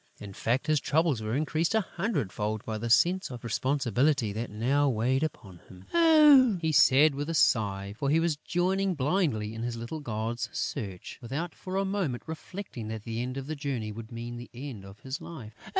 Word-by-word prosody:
In 100 Hz, -1 st, -9 dB
fact, 120 Hz, +8 st, 0 dB
his 155 Hz, -1 st, +2 dB
troubles 155 Hz, -6 st, +1 dB
were 110 Hz, +2 st, -2 dB
increased 155 Hz, +6 st, 0 dB
a 220 Hz, -, +4 dB
hundred 170 Hz, -, -2 dB
fold 105 Hz, 0 st, -3 dB
by 110 Hz, -1 st, -3 dB
the 120 Hz, +2 st, -3 dB
sense 180 Hz, +10 st, +3 dB
of 125 Hz, -2 st, -8 dB
responsibility 130 Hz, -1 st, +1 dB
that 115 Hz, +3 st, -4 dB
now 135 Hz, +7 st, +1 dB
weighed 125 Hz, +3 st, +1 dB
upon 100 Hz, -, -5 dB
him. 90 Hz, 0 st, -14 dB
"Ah!" 300 Hz, -, +7 dB
he 160 Hz, -1 st, 0 dB
said, 145 Hz, +1 st, +6 dB
with 145 Hz, +3 st, -4 dB
a 165 Hz, -, -1 dB
sigh, 100 Hz, -8 st, +2 dB
for 140 Hz, +4 st, -1 dB
he 155 Hz, +3 st, +4 dB
was 165 Hz, -2 st, +1 dB
joining 185 Hz, +4 st, 0 dB
blindly 135 Hz, -, 0 dB
in 115 Hz, -, -6 dB
his 120 Hz, 0 st, -3 dB
little 120 Hz, +7 st, -5 dB
gods' 120 Hz, -2 st, -3 dB
search, 95 Hz, -4 st, -5 dB
without 145 Hz, +8 st, -4 dB
for 185 Hz, 0 st, -7 dB
a 195 Hz, -, +1 dB
moment 190 Hz, -11 st, -2 dB
reflecting 160 Hz, -, -7 dB
that 110 Hz, -1 st, -5 dB
the 115 Hz, 0 st, -3 dB
end 125 Hz, +2 st, -4 dB
of 135 Hz, -, -4 dB
the 155 Hz, +2 st, -4 dB
journey 135 Hz, -7 st, -3 dB
would 110 Hz, +2 st, -9 dB
mean 120 Hz, +1 st, -6 dB
the 120 Hz, -, -9 dB
end 125 Hz, -6 st, -7 dB
of 95 Hz, +1 st, -13 dB
his 135 Hz, +1 st, -5 dB
life. 120 Hz, -10 st, -9 dB
130 Hz, 200 wpm, -28 LUFS, 110-160 Hz, -, Ah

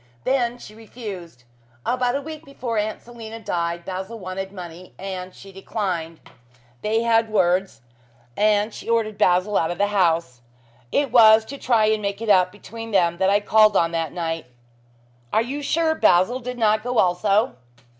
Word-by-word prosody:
Then 245 Hz, -2 st, 0 dB
she 215 Hz, -, -12 dB
refused. 205 Hz, -, -9 dB, 0.4 s
About 250 Hz, 0 st, 0 dB
a 280 Hz, -, -2 dB
week 310 Hz, +1 st, -8 dB
before 250 Hz, -6 st, -4 dB
Aunt 215 Hz, +1 st, -3 dB
Selina 225 Hz, -2 st, -9 dB
died, 170 Hz, -4 st, -3 dB
Basil 190 Hz, +4 st, -5 dB
wanted 190 Hz, -1 st, -6 dB
money, 180 Hz, -2 st, -10 dB
and 185 Hz, -1 st, -6 dB
she 195 Hz, -, -13 dB
declined. 185 Hz, -4 st, -4 dB, 0.6 s
They 220 Hz, +2 st, 0 dB
had 225 Hz, -1 st, +2 dB
words 185 Hz, -, +1 dB, 0.5 s
and 210 Hz, -, +2 dB
she -, -, -9 dB
ordered 225 Hz, -2 st, 0 dB
Basil 185 Hz, +3 st, +2 dB
out 160 Hz, -, 0 dB
of 175 Hz, -, -4 dB
the 205 Hz, -, +2 dB
house. 165 Hz, -9 st, +1 dB, 0.5 s
It 280 Hz, -4 st, +1 dB
was 220 Hz, -2 st, +7 dB
to 280 Hz, +5 st, -8 dB
try 230 Hz, -4 st, +3 dB
and 215 Hz, 0 st, +1 dB
make 200 Hz, 0 st, -3 dB
it 225 Hz, -1 st, -4 dB
up 185 Hz, -2 st, +4 dB
between 225 Hz, +3 st, -9 dB
them 175 Hz, -5 st, +2 dB
that 190 Hz, 0 st, +3 dB
I 205 Hz, +1 st, +3 dB
called 215 Hz, -1 st, +4 dB
on 165 Hz, 0 st, +2 dB
that 165 Hz, -3 st, -2 dB
night." 165 Hz, -4 st, -4 dB, 0.8 s
"Are 220 Hz, -, +2 dB
you 275 Hz, +5 st, -5 dB
sure 320 Hz, +2 st, +1 dB
Basil 185 Hz, -, +3 dB
did 250 Hz, 0 st, -6 dB
not 215 Hz, -2 st, +2 dB
go 245 Hz, +1 st, -3 dB
also?" 200 Hz, +6 st, +2 dB
210 Hz, 170 wpm, -22 LUFS, 180-230 Hz, 0.8 s, was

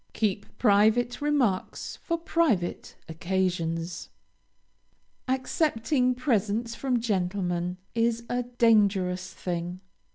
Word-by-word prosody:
Keep 205 Hz, -2 st, -2 dB
private 220 Hz, +4 st, +3 dB
remarks 275 Hz, -10 st, 0 dB
for 335 Hz, -, -2 dB
private 325 Hz, -, 0 dB
occasions. 170 Hz, -1 st, -2 dB, 1.2 s
Accepting 255 Hz, -1 st, +1 dB
presents 230 Hz, -3 st, 0 dB
from 250 Hz, 0 st, 0 dB
gentlemen 180 Hz, -4 st, -1 dB, 0.2 s
is 230 Hz, 0 st, +1 dB
a 245 Hz, 0 st, 0 dB
dangerous 205 Hz, -7 st, +2 dB
thing. 175 Hz, 0 st, -4 dB
215 Hz, 85 wpm, -27 LUFS, 180-245 Hz, 1.2 s, private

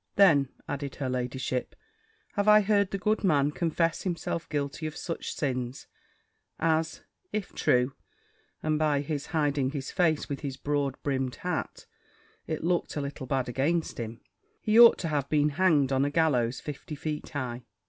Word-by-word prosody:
"Then," 150 Hz, -9 st, +5 dB, 0.2 s
added 140 Hz, -1 st, -4 dB
her 135 Hz, -2 st, -3 dB
ladyship, 125 Hz, 0 st, -2 dB, 0.6 s
"have 205 Hz, 0 st, 0 dB
I 210 Hz, 0 st, +8 dB
heard 200 Hz, -1 st, +2 dB
the 195 Hz, -, -2 dB
good 210 Hz, +4 st, 0 dB
man 145 Hz, -6 st, +3 dB
confess 165 Hz, +1 st, 0 dB
himself 170 Hz, -2 st, -3 dB
guilty 145 Hz, +1 st, -2 dB
of 155 Hz, -, -7 dB
such 165 Hz, -, -4 dB
sins, 130 Hz, -3 st, -3 dB, 0.7 s
as, 160 Hz, 0 st, 0 dB, 0.3 s
if 210 Hz, -3 st, -3 dB
true 125 Hz, +2 st, +2 dB, 0.7 s
(and 155 Hz, -1 st, +1 dB
by 150 Hz, -2 st, +2 dB
his 145 Hz, -1 st, -4 dB
hiding 145 Hz, -4 st, +1 dB
his 140 Hz, -1 st, -5 dB
face 160 Hz, -5 st, +1 dB
with 140 Hz, -, -4 dB
his 135 Hz, -3 st, -5 dB
broad 140 Hz, -1 st, -1 dB
brimmed 130 Hz, -3 st, -1 dB
hat, 180 Hz, -2 st, -4 dB, 0.6 s
it 155 Hz, -1 st, -3 dB
looked 175 Hz, +1 st, 0 dB
a 150 Hz, -, -1 dB
little 140 Hz, -1 st, -5 dB
bad 130 Hz, -1 st, 0 dB
against 145 Hz, +7 st, 0 dB
him), 115 Hz, 0 st, -6 dB, 0.4 s
he 215 Hz, +1 st, +3 dB
ought 235 Hz, -1 st, +9 dB
to 170 Hz, -, -3 dB
have 145 Hz, -3 st, -1 dB
been 150 Hz, -1 st, +3 dB
hanged 150 Hz, -4 st, +3 dB
on 135 Hz, 0 st, +2 dB
a 145 Hz, -, +1 dB
gallows 135 Hz, -6 st, +2 dB
fifty 150 Hz, +1 st, -7 dB
feet 150 Hz, +1 st, -4 dB
high." 130 Hz, -5 st, -4 dB
145 Hz, 165 wpm, -28 LUFS, 135-165 Hz, 0.7 s, ought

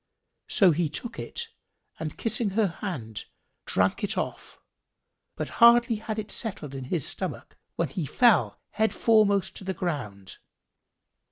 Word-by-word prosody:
So 195 Hz, -6 st, +5 dB
he 160 Hz, 0 st, 0 dB
took 230 Hz, +10 st, -6 dB
it 470 Hz, -1 st, -5 dB, 0.5 s
and 155 Hz, -1 st, -5 dB
kissing 225 Hz, -1 st, -1 dB
her 220 Hz, -, +4 dB
hand, 155 Hz, -, -6 dB, 0.4 s
drank -, -, +1 dB
it -, -, -1 dB
off, -, -, -4 dB, 0.8 s
but -, -, -3 dB
hardly 235 Hz, -1 st, +7 dB
had 215 Hz, 0 st, -5 dB
it 215 Hz, -1 st, -4 dB
settled 185 Hz, -, -2 dB
in 135 Hz, -1 st, -6 dB
his 150 Hz, +1 st, 0 dB
stomach -, -, -5 dB, 0.2 s
when 165 Hz, -4 st, -1 dB
he 155 Hz, +1 st, -4 dB
fell 240 Hz, -, +3 dB
head 220 Hz, +1 st, 0 dB
foremost 205 Hz, -4 st, +3 dB
to -, -, -8 dB
the 190 Hz, 0 st, -3 dB
ground. 115 Hz, -, -4 dB
190 Hz, 145 wpm, -27 LUFS, 150-220 Hz, 0.8 s, hardly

